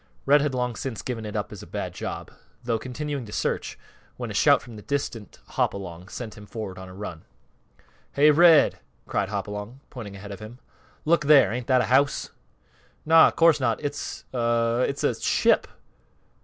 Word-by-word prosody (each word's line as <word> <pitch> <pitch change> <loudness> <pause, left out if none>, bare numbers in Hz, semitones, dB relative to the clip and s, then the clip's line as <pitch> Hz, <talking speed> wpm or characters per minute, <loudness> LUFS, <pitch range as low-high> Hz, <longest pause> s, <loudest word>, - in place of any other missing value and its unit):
Red 145 +1 +5
had 140 -2 -1
long 125 -2 -1
since 125 -3 -5
given 115 -4 -4
it 105 - -7
up 105 -1 -3
as 105 - -9
a - - -11
bad - - -5
job, - - -6 0.3
though 115 -2 -1
continuing 140 +2 -4
to - - -10
search, - - -2 0.4
when - - -5
a - - -5
shout - - +5
from 120 - -12
the 105 - -9
distant 125 -6 -4
Hopalong 90 -2 -3
sent 110 +1 -7
him 105 0 -12
forward 100 -5 -6
on 95 0 -9
a - - -11
run. 90 -5 -7 0.9
"Hey, 150 +2 +6
Red!" 165 -1 +6 0.3
cried 100 - -1
Hopalong, 105 +4 -5
pointing 105 -7 -8
ahead 100 +1 -9
of 100 - -7
them. 110 +3 -10 0.5
"Look 160 -1 +3
there! 145 -6 +7
Ain't 120 0 -4
that 130 -2 +4
a - - 0
house?" 140 +3 +2 0.7
"Naw; 160 +1 +7
course 165 -3 +4
not! 115 -5 0
It's 145 +1 -5
a 115 0 +1
it's 140 - -4
a - - +2
ship!" - - +2
120 Hz, 185 wpm, -25 LUFS, 105-140 Hz, 0.9 s, there